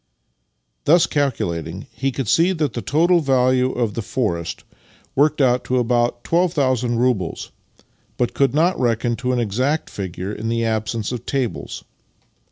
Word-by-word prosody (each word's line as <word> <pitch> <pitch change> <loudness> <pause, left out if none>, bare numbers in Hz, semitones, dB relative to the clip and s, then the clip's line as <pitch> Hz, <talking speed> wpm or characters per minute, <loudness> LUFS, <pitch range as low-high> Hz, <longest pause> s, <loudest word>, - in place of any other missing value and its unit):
Thus 165 +3 +5
calculating, 90 - -2
he 135 +1 -1
could 130 -2 -4
see 170 - +3
that 150 -8 -1
the 120 - -3
total 170 +7 +3
value 130 -3 +2
of 115 -4 -1
the 115 - -3
forest 85 -7 -2 0.5
worked 150 +2 +3
out 125 -2 +2
at 130 - +2
about 120 0 +1
12,000 135 -9 +1
roubles, 115 -8 -1 0.7
but 120 - 0
could 135 -1 +1
not 170 +4 +2
reckon 120 0 +1
to 125 +2 -1
an 125 - +1
exact 125 +8 -1
figure 95 0 -5
in 110 +1 -4
the 115 0 0
absence 110 0 -2
of 125 - -6
tables. 130 -5 -3
125 Hz, 150 wpm, -21 LUFS, 115-140 Hz, 0.7 s, Thus